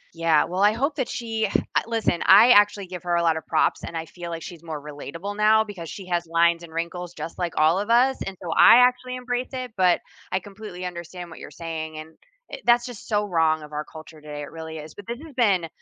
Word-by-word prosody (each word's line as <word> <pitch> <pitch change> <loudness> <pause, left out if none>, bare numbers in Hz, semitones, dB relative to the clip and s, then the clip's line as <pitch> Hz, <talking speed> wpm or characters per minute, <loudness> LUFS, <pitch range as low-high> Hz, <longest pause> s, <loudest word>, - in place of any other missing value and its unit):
Yeah, 165 -2 +3
well, 185 +2 -3
I 205 +1 +5
hope 275 +6 -1
that 260 - -1
she 225 -2 -2 0.3
ah - - +4
listen 225 -7 0
I 215 +6 +8
actually 205 -2 +5
give 180 -1 -8
her 175 -1 0
a 170 - +2
lot 165 -1 +3
of 160 - -6
props, - - +1
and 165 - -5
I 160 - -4
feel 175 +1 -9
like 165 -1 -5
she's 170 -3 -9
more 160 -3 -5
relatable 150 +7 -7
now 215 +1 +4
because 190 -7 -8
she 195 - -8
has 175 -1 -2
lines 170 0 +3
and 170 -1 -11
wrinkles 170 +1 -4
just 165 - -7
like 175 -2 -2
all 160 +4 +4
of 205 +2 -4
us, 255 +3 +4
and, 195 -1 -5
so, 170 - -5
I - - +8
actually 255 0 -5
embrace 250 0 -3
it, 255 -2 -5
but 180 -2 +3 0.3
I 190 - +1
completely 195 -2 -9
understand 175 0 -7
what - - -11
you're - - -9
saying, 160 -2 -6
and, 155 +1 -8 0.4
eh, - - -5
that's 240 0 +4
just 245 -4 -9
so 210 -1 +1
wrong 160 -4 +1
of 150 - -12
our 150 0 -3
culture 155 -1 -13
today 150 -1 -7
it 145 - -9
really 160 -1 -7
is, 155 0 -9
but 205 - -12
this 235 +1 -4
has 315 - -12
been 200 -9 +2
180 Hz, 245 wpm, -24 LUFS, 165-215 Hz, 0.4 s, I